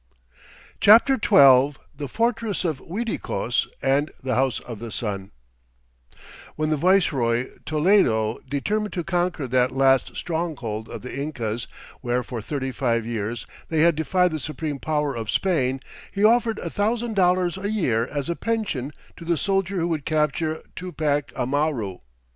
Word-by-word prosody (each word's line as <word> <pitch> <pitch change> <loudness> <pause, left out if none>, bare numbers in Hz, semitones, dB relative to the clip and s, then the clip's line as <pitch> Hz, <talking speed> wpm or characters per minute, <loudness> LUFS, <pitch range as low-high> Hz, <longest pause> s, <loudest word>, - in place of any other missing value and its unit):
CHAPTER 230 +6 +7
XII 140 - +6 0.2
The 145 0 -5
Fortress 225 -4 0
of 155 -5 -1
Uiticos 170 - -2 0.2
and 140 +3 +2
the 130 -1 -1
House 130 0 +1
of 115 -4 -8
the 115 0 -7
Sun 100 -4 -3 1.3
When 155 0 -1
the - - +3
viceroy, 140 -9 +2 0.2
Toledo, 150 - +2
determined 210 +10 -1
to 175 - -2
conquer 175 -5 -1
that 125 0 +3
last 135 0 +2
stronghold 145 -11 -3
of - - -8
the 125 - -7
Incas 120 -5 -3 0.3
where 125 0 -1
for 120 -3 -6
thirty 130 +3 -3
five 120 -3 0
years 115 0 -3 0.2
they 160 -1 +1
had 170 +1 +5
defied 180 +3 +2
the 155 - -3
supreme 150 0 -4
power 150 -1 -1
of 110 -2 -5
Spain, 135 -8 +1 0.3
he 200 - -2
offered 230 0 +4
a - - -5
thousand 225 +2 -1
dollars 180 -1 +2
a 200 +1 -3
year 125 - +1
as 145 -2 -3
a 170 - -1
pension 205 - -2 0.3
to - - -10
the 170 0 0
soldier 195 +2 0
who 170 -2 0
would 155 -4 -2
capture 155 +1 0
Tupac 155 -5 -2
Amaru. 130 -7 -1
150 Hz, 150 wpm, -24 LUFS, 125-180 Hz, 1.3 s, CHAPTER